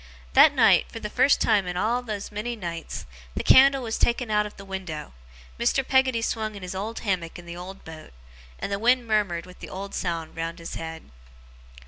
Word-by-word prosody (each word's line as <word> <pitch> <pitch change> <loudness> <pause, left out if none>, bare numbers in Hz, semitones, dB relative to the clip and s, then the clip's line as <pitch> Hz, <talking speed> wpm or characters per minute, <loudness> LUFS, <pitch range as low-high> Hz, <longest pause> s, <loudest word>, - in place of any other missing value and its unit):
That - - +7
night, - - +5
for 225 - -7
the 210 -1 -6
first 280 - +4
time 205 -4 +2
in 180 0 -3
all 235 +6 +1
those 215 -4 -5
many 215 +4 -3
nights, 170 -6 -6 0.3
the - - -2
candle 270 0 +6
was 225 -2 -3
taken 235 -1 +1
out 210 0 +2
of 210 - -14
the 195 - -10
window, 185 - -6 0.5
Mr. 255 +3 +1
Peggotty 260 -3 +3
swung 220 -2 -2
in 200 - -9
his 180 - -5
old 210 +4 -4
hammock 185 -6 -2
in 175 - -11
the 170 0 -7
old 185 +2 -9
boat, 160 -1 -10 0.5
and - - -5
the 200 - -1
wind 245 +2 +3
murmured 205 -6 0
with 180 0 -14
the - - -9
old 195 +1 -7
sound 165 -3 -3
round 165 +1 -4
his 165 -1 -8
head. 160 0 -7
200 Hz, 205 wpm, -25 LUFS, 175-230 Hz, 0.5 s, That